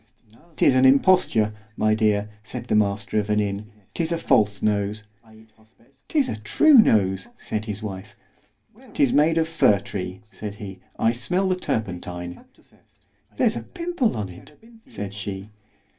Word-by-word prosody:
'Tis - - +4
an 130 0 +4
imposture, 135 - +4 0.2
my 110 0 +2
dear, 105 -1 +1
said 120 +2 -7
the 120 - 0
master 105 0 +1
of 105 - -2
the 105 - +1
inn——'tis 105 - -3
a 170 - +1
false 105 -10 +2
nose. 105 0 0 1.0
'Tis 290 -4 +1
a - - -4
true 295 - +3
nose, 95 - +3
said 110 0 -4
his 105 0 -5
wife. 95 -2 -7 0.8
'Tis 135 - +3
made 155 +3 +4
of 165 0 +2
fir 160 -11 +4
tree, 95 -2 -6
said 105 -2 -7
he, 100 -3 -9 0.2
I 115 - +3
smell 180 +11 0
the 185 - +2
turpentine.—— 90 - -4 0.9
There's - - +2
a 115 - -3
pimple 335 - -2
on 100 -3 -3
it, 90 +11 -14 0.3
said 100 -1 -6
she. 100 0 -6
105 Hz, 145 wpm, -23 LUFS, 100-130 Hz, 1.0 s, Tis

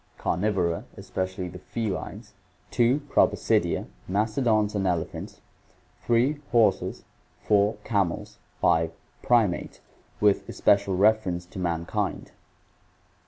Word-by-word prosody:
Carnivora, 90 -3 0
especially 95 0 -4
the 90 +1 -9
felines. 105 +1 -5 0.4
2. 125 +4 +3
Proboscidea, 145 - +1 0.2
mastodons 110 +1 +1
and 100 -2 0
elephants. 85 -3 -3 0.7
3. 120 +5 +3
Horses. 115 -2 +2 0.4
4. 105 0 +3
Camels. 100 -6 -1 0.2
5. 80 0 +3 0.3
Primates, 110 -7 +1 0.4
with 105 -1 +2
especial 100 -2 +2
reference 100 -4 +2
to 90 - -10
mankind. 90 +4 -2
100 Hz, 90 wpm, -26 LUFS, 90-110 Hz, 0.7 s, 2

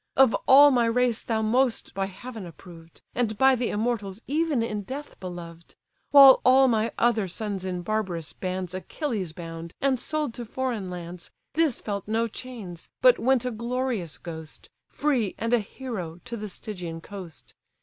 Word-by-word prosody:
Of 265 -4 +6
all 285 +2 +9
my 240 -3 +3
race 240 0 +1
thou 220 -1 -1
most 245 +2 +1
by 195 0 -1
heaven 215 +1 -8
approved, 165 0 -14
And 225 -3 -1
by 265 +3 +6
the 245 -2 0
immortals 210 -3 -2
even 300 -4 +1
in 210 -2 -3
death 270 +9 -8
beloved! 170 -2 -9 0.3
While 275 -2 +9
all 265 +1 +6
my 225 -2 +1
other 225 -4 +2
sons 200 +1 -4
in 180 -1 -3
barbarous 180 -6 -2
bands 185 -1 -4
Achilles 195 - -3
bound, 165 0 -8
and 270 -2 +1
sold 305 -4 -2
to 240 - -6
foreign 235 -5 -3
lands, 175 -1 -8 0.2
This 315 -5 +1
felt 200 -2 -4
no 225 +2 +1
chains, 215 -8 -8
but - - +7
went 255 0 +2
a 250 - -1
glorious 235 -6 -2
ghost, 160 -2 -9 0.2
Free, 255 -10 0
and 230 +1 -1
a 240 - +5
hero, 200 -7 -6
to 245 -1 -5
the 210 -2 -6
Stygian 175 -5 -7
coast. 185 -5 -10
220 Hz, 165 wpm, -26 LUFS, 180-255 Hz, 0.3 s, all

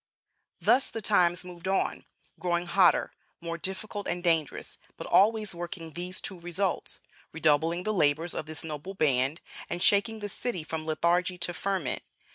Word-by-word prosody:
Thus 260 +2 +3
the 225 - -5
times 180 -3 +3
moved 175 0 -8
on 190 0 0 0.3
growing 175 0 0
hotter, 175 0 +4 0.3
more 170 0 -5
difficult 200 +3 -4
and 175 0 -2
dangerous, 165 -4 0 0.2
but - - -6
always 215 0 +3
working 170 -2 -6
these 180 +1 -2
two 190 - -3
results: 175 +2 -1 0.3
redoubling 165 +2 +2
the 215 - 0
labors 160 -1 +2
of 155 - -4
this 155 -1 -4
noble 160 +5 -6
band, 140 -2 +2 0.3
and 175 +1 -2
shaking 210 +2 +4
the 205 -1 -4
city 205 -3 -2
from 155 0 -5
lethargy 175 +3 +1
into 175 0 -2
ferment. 185 -8 -1
175 Hz, 155 wpm, -28 LUFS, 165-190 Hz, 0.3 s, hotter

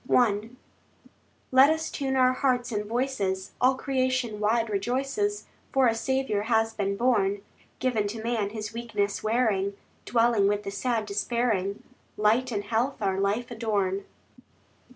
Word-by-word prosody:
I 215 -3 +3 1.0
Let 265 +2 +7
us 315 0 -1
tune 270 -2 -2
our 255 -1 +4
hearts 255 -2 0
and 210 -1 -2
voices— 210 -6 -1
All 260 +1 +5
creation 255 -4 -1
wide 225 +2 +2
rejoices, 270 - -1 0.3
For 270 -2 +3
a 230 - +4
Saviour 265 -3 -1
has 225 -1 +2
been 200 -2 -2
born; 205 -5 +1 0.3
Given 225 -5 0
to 220 +2 -6
man, 225 -3 0
his 215 0 -6
weakness 210 -4 -2
wearing, 215 -4 +1 0.3
Dwelling 230 -4 +3
with 205 0 0
the 195 - -4
sad 225 +2 -1
despairing, 205 -1 -1 0.3
Light 230 +5 +2
and 205 -2 -2
health 235 +6 -1
our 195 -2 0
life 210 +5 -1
adorn. 200 -4 -1
225 Hz, 140 wpm, -27 LUFS, 205-255 Hz, 1.0 s, Let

